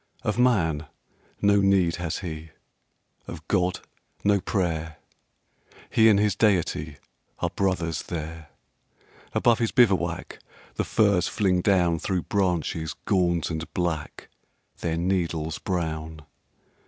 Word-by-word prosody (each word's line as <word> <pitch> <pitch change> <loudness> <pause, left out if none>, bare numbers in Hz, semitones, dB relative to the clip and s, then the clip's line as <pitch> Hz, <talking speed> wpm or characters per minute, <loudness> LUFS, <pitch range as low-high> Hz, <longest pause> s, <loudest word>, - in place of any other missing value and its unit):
Of 105 0 -1
man 80 -12 +2 0.6
no 100 0 +5
need 95 -4 +3
has 85 -3 -3
he, 80 -1 -6 0.8
of 80 -2 -9
God, 90 -2 +1 0.4
no 100 0 +3
prayer; 80 -6 -2 0.9
He 110 0 +6
and 105 - +5
his 105 -2 +2
Deity 85 -8 +1 0.4
are - - -2
brothers 90 -5 -1
there. 80 -2 -6 0.8
Above 120 -2 +3
his 115 -2 0
bivouac 95 -9 +2 0.3
the - - -1
firs 100 -5 +2
fling 95 -3 +1
down 90 -4 +2
Through 90 -1 -1
branches 85 -5 -1
gaunt 85 -3 +1
and 80 0 -5
black, 85 -4 -3 0.5
their 80 -1 -1
needles 85 -3 -1
brown. 80 -3 -3
90 Hz, 115 wpm, -25 LUFS, 80-100 Hz, 0.9 s, He